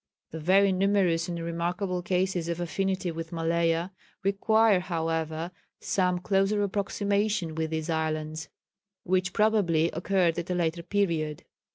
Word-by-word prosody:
The 160 - -6
very 190 +5 +4
numerous 185 -3 +2
and 170 -1 -4
remarkable 175 +2 -2
cases 180 -1 0
of 170 0 -2
affinity 185 +1 -1
with 165 0 -6
Malaya, 165 +1 0 0.3
require, 210 +1 +3
however, 165 -1 -2 0.3
some 180 -2 +1
closer 195 +3 +1
approximation 200 -2 0
with 160 0 -2
these 160 0 -3
islands, 155 -1 -2 0.5
which 185 +1 +1
probably 190 -7 +2
occurred 175 0 +1
at 170 - -6
a 180 - 0
later 170 -1 0
period. 165 -5 -1
175 Hz, 130 wpm, -28 LUFS, 165-195 Hz, 0.5 s, very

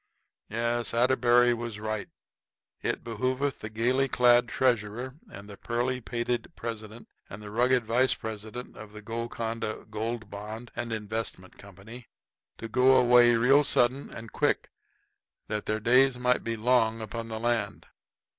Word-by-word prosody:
Yes, 120 +1 -1
Atterbury 120 0 +4
was 115 -2 -5
right; 110 -1 -4 0.7
it - - -2
behooveth 130 +5 -2
the 110 - -6
gaily 125 +5 +1
clad 120 -1 +4
treasurer 120 0 0 0.2
and 100 +1 -10
the 100 -1 -10
pearly 125 +2 -2
pated 120 +6 -3
president 110 0 -7 0.2
and 100 - -8
the 105 -1 -9
rugged 125 +2 +2
vice 125 +4 +3
president 110 +3 -7
of 110 -1 -11
the 105 0 -10
Golconda 115 0 -4
Gold 110 0 -4
Bond 110 +4 -7
and 120 -1 -4
Investment 110 -3 -5
Company 100 +5 -12 0.5
to 115 - -6
go 130 +3 +4
away 120 -1 +6
real 135 +5 +5
sudden 130 0 +1
and 115 -1 -9
quick - - 0 0.8
that 105 0 -4
their 110 0 0
days 125 +3 +4
might 125 0 +1
be 115 0 -2
longer 115 -1 +2
upon 115 +1 -6
the 110 -1 -5
land. 115 -4 -1
115 Hz, 145 wpm, -28 LUFS, 110-125 Hz, 0.8 s, away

